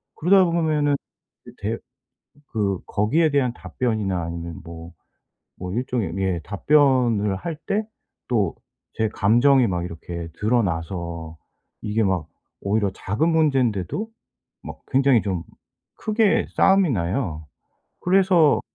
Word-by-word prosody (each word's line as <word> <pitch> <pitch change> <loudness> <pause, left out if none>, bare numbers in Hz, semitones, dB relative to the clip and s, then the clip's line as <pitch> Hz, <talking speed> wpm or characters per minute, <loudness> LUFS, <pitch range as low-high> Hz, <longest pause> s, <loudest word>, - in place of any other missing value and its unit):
그러다 185 +4 +5
보면은 155 -4 +1 0.7
대 110 +3 -2 0.8
그 100 -4 0
거기에 150 +11 +1
대한 135 -4 +1
답변이나 105 -10 -2
아니면 85 0 -6
뭐 85 0 -10 0.7
뭐 90 0 -5
일종의 120 -7 -2
예 95 -3 0
답변을 120 -4 +2
할 165 - -4
때 210 +2 0 0.4
또 105 -8 +1 0.4
제 110 -1 0
감정이 120 +6 +4
막 90 -1 -2
이렇게 85 0 -6
드러나서 85 -6 -1 0.5
이게 110 +2 0
막 90 -5 0 0.3
오히려 100 0 0
작은 110 - -1
문젠데도 135 - +1 0.6
막 - - -8
굉장히 135 -3 +4
좀 90 -4 -3 0.5
크게 215 -1 +2
싸움이 195 -4 +4
나요. 85 - -2 0.5
그래서 180 -5 +4
110 Hz, 225 characters per minute, -23 LUFS, 90-145 Hz, 0.8 s, 그러다